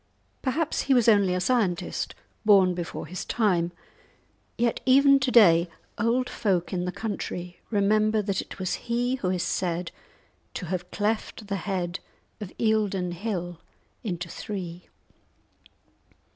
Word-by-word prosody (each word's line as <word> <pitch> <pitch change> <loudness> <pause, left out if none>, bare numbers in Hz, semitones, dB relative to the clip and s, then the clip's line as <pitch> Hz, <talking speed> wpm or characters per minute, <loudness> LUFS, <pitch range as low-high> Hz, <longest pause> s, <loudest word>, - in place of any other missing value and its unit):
Perhaps 300 +4 0
he 270 - +6
was 240 -2 +3
only 200 -5 +5
a - - 0
scientist, 190 -4 0 0.3
born 195 -4 +6
before 175 -1 -5
his 180 +1 -5
time; 180 -7 +1 0.9
yet 235 0 +1
even 275 +2 +6
to 260 -1 0
day 175 -8 +6 0.3
old 240 +3 +1
folk 190 -5 -1
in 180 -1 -1
the 180 - -2
country 180 -4 -5
remember 215 +1 +2
that 195 -1 -1
it - - -11
was 185 -2 -2 0.2
he 245 +2 +1
who 185 -7 -2
is 180 -2 0
said 175 -2 -2 0.6
to 180 - -4
have 180 +1 -4
cleft 215 +1 -2
the 200 - 0
head 180 -2 -3 0.4
of 205 -4 -7
Eildon 205 -5 +1
Hill 175 -2 -4 0.4
into 175 -5 -3
three! 180 -2 -6
195 Hz, 135 wpm, -26 LUFS, 180-225 Hz, 0.9 s, he